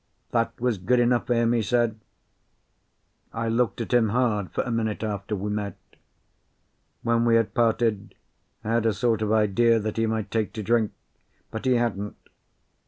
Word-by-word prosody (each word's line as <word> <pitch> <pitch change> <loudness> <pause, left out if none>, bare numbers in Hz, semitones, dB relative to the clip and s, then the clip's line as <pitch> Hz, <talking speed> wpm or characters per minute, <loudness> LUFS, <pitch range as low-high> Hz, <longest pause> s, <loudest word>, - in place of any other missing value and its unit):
That 115 -1 0
was 120 -4 0
good 125 +7 +2
enough 120 0 +2
for 120 - +2
him, 115 0 +2
he 120 - +2
said. 115 +1 0 1.3
I 115 0 -2
looked 120 +1 0
at 115 - -4
him 115 -3 +4
hard 110 -4 0
for - - -1
a 125 - -4
minute 110 -2 -1
after 105 -1 -3
we 105 +1 -3
met. 105 -3 -3 1.3
When 115 0 +2
we 115 -1 +4
had 115 -2 +1
parted 115 -4 +1 0.5
I 105 - -4
had 115 0 +2
a 110 - +2
sort 115 0 0
of 110 -1 0
idea 110 +2 +3
that 110 0 -4
he 115 0 +1
might 110 -2 -2
take 110 -2 -1
to 110 - -5
drink, 115 0 +2 0.6
but 110 +3 -6
he 130 - +4
hadn't. 105 -4 -1
115 Hz, 175 wpm, -25 LUFS, 105-120 Hz, 1.3 s, him